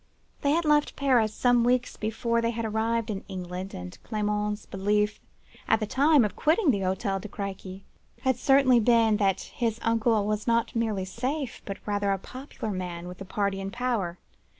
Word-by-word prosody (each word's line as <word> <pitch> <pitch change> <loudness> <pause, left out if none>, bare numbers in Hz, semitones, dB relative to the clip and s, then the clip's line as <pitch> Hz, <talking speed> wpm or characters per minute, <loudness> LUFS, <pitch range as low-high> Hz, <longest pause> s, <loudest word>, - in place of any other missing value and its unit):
They 285 - +1
had 335 +1 +1
left 295 -1 +3
Paris 250 -6 +3
some 245 +2 +3
weeks 245 +1 +1
before 230 +2 -1
they 230 - +1
had 230 -1 -3
arrived 220 +1 0
in 195 -2 -5
England, 185 0 -6
and 90 0 -8
Clement's 210 -1 -2
belief 210 +2 0 0.5
at 220 - +3
the 215 - -1
time 275 +3 +4
of 205 - -4
quitting 315 +1 +3
the 200 - 0
Hotel 195 +1 -1
de 215 - -7
Crequy 195 -1 -6 0.4
had 260 -1 +2
certainly 260 0 +4
been, 225 -2 +4
that 195 -3 +1
his 230 -2 -2
uncle 225 -2 +2
was 210 +1 -2
not 230 0 +1
merely 220 -5 0
safe, 255 +6 -3
but 195 - -5
rather 205 -1 0
a 195 - +1
popular 255 +1 -7
man 175 -2 -5
with 180 0 -9
the 195 - -7
party 200 0 -1
in 195 - -4
power. 220 -6 -2
215 Hz, 180 wpm, -27 LUFS, 195-240 Hz, 0.5 s, time